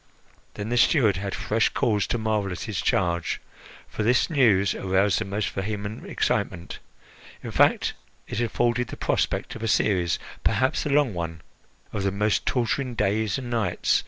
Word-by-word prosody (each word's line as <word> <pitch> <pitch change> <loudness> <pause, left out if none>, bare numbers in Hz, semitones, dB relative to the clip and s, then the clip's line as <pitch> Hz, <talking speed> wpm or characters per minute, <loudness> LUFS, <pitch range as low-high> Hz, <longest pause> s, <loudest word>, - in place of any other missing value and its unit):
Then 105 +1 -4
the 120 - 0
steward 115 - +4
had 100 0 -3
fresh 110 +1 +1
cause 105 -4 +1
to 120 - 0
marvel 110 -3 -1
at 90 - -5
his 105 -3 -3
charge, 85 -2 0 0.5
for - - -5
this 120 +8 +2
news 105 - +4
aroused 95 +1 +1
the - - -2
most 100 +1 -2
vehement 100 +1 -4
excitement. 85 -1 -2 0.6
In - - -5
fact, - - +3 0.3
it 115 - -2
afforded 120 +1 +1
the - - -8
prospect - - -1
of - - -8
a 115 - -1
series 90 -5 +2 0.3
perhaps 130 +4 +1
a - - -2
long 140 -5 +3
one 80 -2 -4 0.5
of 105 - -2
the 100 0 0
most 105 +2 0
torturing 125 +1 0
days 105 +2 +1
and 125 -3 -6
nights. 110 -7 +1
105 Hz, 165 wpm, -25 LUFS, 95-120 Hz, 0.6 s, steward